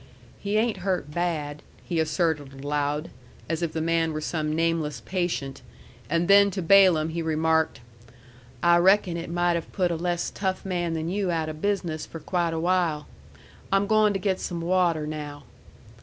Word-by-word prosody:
"He 205 +1 -1
ain't 220 -1 +1
hurt 185 -6 -2
bad," 150 -3 -2 0.2
he 170 -2 -1
asserted 155 -4 -1
aloud, 145 +2 -1 0.4
as 165 +1 -2
if 170 -2 -1
the 160 - -3
man 165 0 +1
were 155 - -2
some 155 -1 -2
nameless 160 -4 0
patient; 175 -8 -2 0.5
and 170 +2 +1
then 200 0 +7
to 190 -2 -4
Balaam 175 -3 +5
he 165 +1 -3
remarked, 160 -3 +1 0.8
"I 170 0 +6
reckon 185 0 +4
it 170 0 -5
might 175 0 +1
have 170 -1 -4
put 180 -3 0
a - - 0
less 175 +1 -2
tough 190 -1 -3
man 175 -3 -1
than 160 0 -3
you 195 +1 -1
out 160 -2 -1
of 155 0 -8
business 180 -6 -1
for 165 - -8
quite 170 0 -1
a - - -1
while. 170 -3 +1 0.7
I'm 195 +1 +3
goin' 215 0 +4
to - - 0
get 190 0 -1
some 170 -2 -4
water 170 -3 +1
now." 150 -1 -6
170 Hz, 175 wpm, -26 LUFS, 155-185 Hz, 0.8 s, then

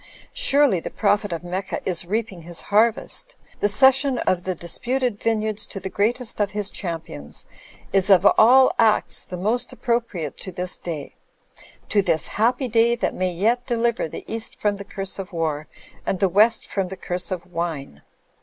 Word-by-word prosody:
Surely 290 - +4
the - - -6
prophet 205 -1 +1
of 170 0 -4
Mecca 185 +2 -3
is 175 -2 -1
reaping 210 -2 -2
his 170 +1 -9
harvest; 235 - +1 0.2
the 205 - +2
ces 265 +6 +6
sion 270 -1 0
of 185 -5 0
the 185 -1 -1
disputed 240 +7 -2
vineyards 215 -2 0
to 195 - -7
the 190 0 -6
greatest 230 +3 -1
of 205 -2 +2
his 205 -1 -3
champions 160 - -6 0.5
is 195 +1 +2
of 190 -3 +6
all 255 +4 +7
acts 220 -2 +3
the 180 - -7
most 220 +7 -1
appropriate 230 - -2
to 190 - -7
this 180 0 -4
day; 155 -5 -6 0.7
to 205 - +3
this 170 -5 0
happy 245 +5 +1
day 230 +1 +3
that 235 - -1
may 185 0 -1
yet 225 +8 0
deliver 235 -6 0
the - - -8
East 225 0 -6
from 205 -1 +1
the 200 - -7
curse 195 -1 -5
of 195 0 -6
war 155 -3 -2 0.4
and 190 - -2
the 195 - +4
West 215 +6 +4
from 195 -2 -2
the 190 +1 -7
curse 180 0 -3
of 185 -2 -4
wine. 165 - -4
200 Hz, 180 wpm, -23 LUFS, 180-230 Hz, 0.7 s, all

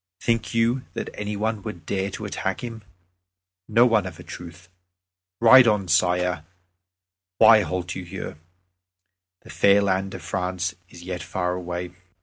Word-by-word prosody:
Think 115 0 -1
you 115 +3 +2
that - - -4
any 105 0 -4
one 110 0 -1
would 85 -3 -8
dare 95 0 -1
to 95 - -7
attack - - -3
him? 115 -2 -6 0.9
No 115 +3 +5
one, 110 -6 +2
of 85 -3 -10
a - - -9
truth. 85 0 -10 0.7
Ride 120 +2 +8
on, 105 -4 +2
Sire; 90 -2 +1 0.9
why 110 -2 +7
halt 90 -2 -3
you 95 - -6
here? 80 -3 -7 1.0
The - - -12
fair 100 0 +4
land 95 -1 0
of 85 - -9
France 90 0 -2 0.2
is 85 - -13
yet 90 0 -5
far 90 -1 -2
away." 90 0 -5
95 Hz, 150 wpm, -24 LUFS, 90-110 Hz, 1.0 s, Ride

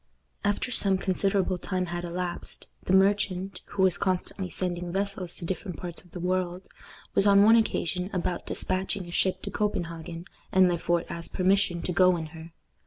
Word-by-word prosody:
After 205 +4 0
some 195 -5 +5
considerable 190 -1 0
time 185 0 -2
had 175 0 -4
elapsed, 175 0 -5 0.2
the - - -1
merchant, 195 -1 +2
who 195 -2 -1
was 180 -2 +3
constantly 185 0 -1
sending 175 -1 -1
vessels 195 -2 -2
to 175 - -5
different 185 0 -4
parts 175 -1 -7
of 180 - -21
the 180 - -8
world, 180 0 -2 0.5
was 195 - +5
on 200 0 +7
one 225 +2 +7
occasion 185 -5 0
about 180 -1 -2
dispatching 185 0 -1
a 175 - -9
ship 185 +1 0
to - - -4
Copenhagen, 170 -4 -3 0.3
and 185 -1 +5
Le 175 -2 0
Fort 170 0 0
asked 170 -1 -7
permission 185 -2 +2
to - - -2
go 185 0 +5
in 160 - -4
her. 165 0 -10
185 Hz, 175 wpm, -27 LUFS, 175-195 Hz, 0.5 s, on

